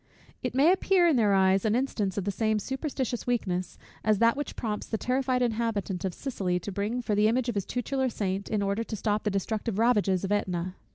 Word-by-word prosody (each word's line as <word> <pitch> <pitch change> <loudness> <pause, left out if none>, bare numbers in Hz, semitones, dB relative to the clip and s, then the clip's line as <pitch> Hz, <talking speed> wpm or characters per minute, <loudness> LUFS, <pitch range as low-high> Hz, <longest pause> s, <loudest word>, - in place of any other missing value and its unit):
It 250 -1 -3
may 290 +6 +6
appear 375 -1 +3
in 320 - +4
their 210 -5 +3
eyes 190 0 +4
an 220 0 +2
instance 215 -7 -1
of 200 - 0
the 200 - -1
same 215 +2 +1
superstitious 265 +1 -3
weakness, 185 -7 -1 0.3
as 215 -1 +3
that 230 +2 +4
which 290 +1 -4
prompts 215 -3 -3
the 220 - -2
terrified 255 +1 0
inhabitant 220 -5 -1
of 185 - -3
Sicily 190 -10 -2
to 200 - -5
bring 210 +6 -2
for 215 - -1
the 210 +1 +4
image 240 +2 +1
of - - -1
his 200 -3 -2
tutelar 260 +2 -1
saint, 195 -3 -3
in 210 -2 0
order 200 +3 0
to 225 - -5
stop 210 +1 -1
the - - +3
destructive 205 +2 -2
ravages 210 -5 +2
of 195 - -2
Ætna. 180 -3 -1
215 Hz, 220 wpm, -28 LUFS, 195-245 Hz, 0.3 s, may